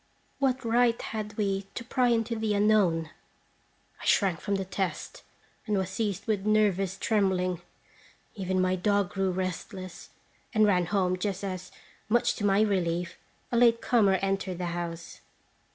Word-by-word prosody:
What 260 -2 0
right 235 0 +3
had 210 -1 -5
we 195 -2 -1
to - - -4
pry 250 +1 +1
into 230 -1 +1
the 220 -2 0
unknown? 195 -7 +2 0.9
I - - -8
shrank 185 -6 +3
from 200 -1 -1
the 195 -1 -2
test, 185 -4 -4 0.5
and 210 -2 +1
was 190 -1 -2
seized 205 -2 -2
with 210 -4 0
nervous 200 -3 +2
trembling. 185 -5 +1 0.7
Even 190 -3 -1
my 185 0 +2
dog 200 0 +1
grew 195 -1 0
restless, 185 0 -5 0.5
and 215 0 +5
ran 180 -4 +2
home 185 -1 +1
just 195 0 -2
as, 185 -2 -5 0.4
much 240 +1 +3
to - - -5
my 195 +1 +4
relief, 175 -4 0 0.3
a 240 - +1
late 230 -1 +5
comer 210 -6 +3
entered 195 -2 -1
the 180 - -3
house. 170 -1 -6
195 Hz, 150 wpm, -28 LUFS, 185-215 Hz, 0.9 s, and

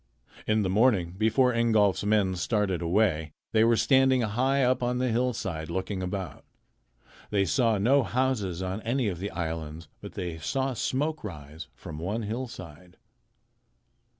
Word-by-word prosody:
In 110 0 +2
the - - 0
morning 100 -4 +3
before 115 +5 +3
Ingolf's 110 -5 +2
men 100 -3 +2
started 95 -1 0
away 85 -4 +1 0.2
they 110 0 +4
were 115 0 +4
standing 130 +2 +4
high 130 +5 +1
up 130 0 +2
on 125 0 0
the 125 0 0
hillside, 110 -9 -2
looking 95 +2 -3
about. 95 -1 -5 0.9
They 100 -1 +2
saw 115 +1 +2
no 130 +8 +4
houses 110 -8 -1
on 95 +3 -3
any 120 0 0
of 90 -3 -5
the 100 +2 -3
islands, 80 -2 -5
but - - -9
they 85 -3 -5
saw 130 +11 -1
smoke 150 +6 -2
rise 75 -5 -8
from 75 -1 -9
one 105 +7 -3
hillside. 95 - -7
105 Hz, 150 wpm, -27 LUFS, 90-125 Hz, 0.9 s, they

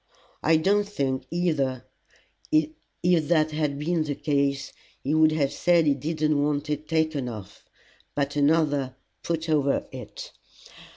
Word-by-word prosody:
I 160 +1 +4
don't 205 +5 +2
think 135 -8 -2
either, 150 -8 0 0.7
if 155 0 +2 0.5
that 155 -2 +3
had 150 -2 -1
been 165 +3 0
the 145 -2 -3
case, 140 -1 0 0.3
he 140 - 0
would 155 0 +5
have 140 -3 0
said 170 -2 +3
he 145 - +4
didn't 150 +1 0
want 145 0 -1
it 150 +1 -3
taken 155 -5 0
off, 105 -5 -9 0.5
but 145 0 -1
another 145 -3 +2 0.3
put 165 -1 -2
over 145 -3 +1
it. - - -9
150 Hz, 135 wpm, -26 LUFS, 140-160 Hz, 0.7 s, would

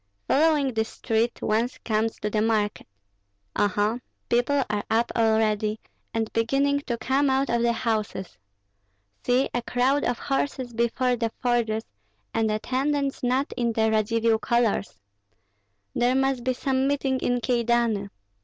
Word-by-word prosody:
Following 295 -3 +3
this 220 0 -1
street, 230 0 -1
one 225 +3 +1 0.2
comes 220 0 0
to 210 - -2
the 215 - +1
market. 215 -2 0 0.7
Oho! 205 +3 +1 0.3
people 255 +4 +2
are 210 -1 -2
up 230 +2 +1
already, 220 -1 +2 0.3
and 225 -1 -2
beginning 275 +5 +2
to 235 - -1
come 270 +3 +1
out 265 0 +1
of 235 0 +1
the 235 0 +3
houses. 220 -5 -2 0.9
See, 250 +2 +2
a 245 - 0
crowd 255 +4 +1
of 245 - 0
horses 270 -3 -2
before 240 +2 +1
the 230 -1 0
forges, 235 -3 0 0.5
and 220 -1 +1
attendants 270 +6 -1
not 255 +3 0
in 235 -1 0
the 220 0 +2
Radzivill 220 +1 +2
colors! 235 -5 0 1.0
There 245 +2 +2
must 270 -2 +1
be 255 +1 +1
some 265 +1 0
meeting 270 -2 0
in 245 -1 0
Kyedani. 235 -4 +1
235 Hz, 140 wpm, -25 LUFS, 220-260 Hz, 1.0 s, Following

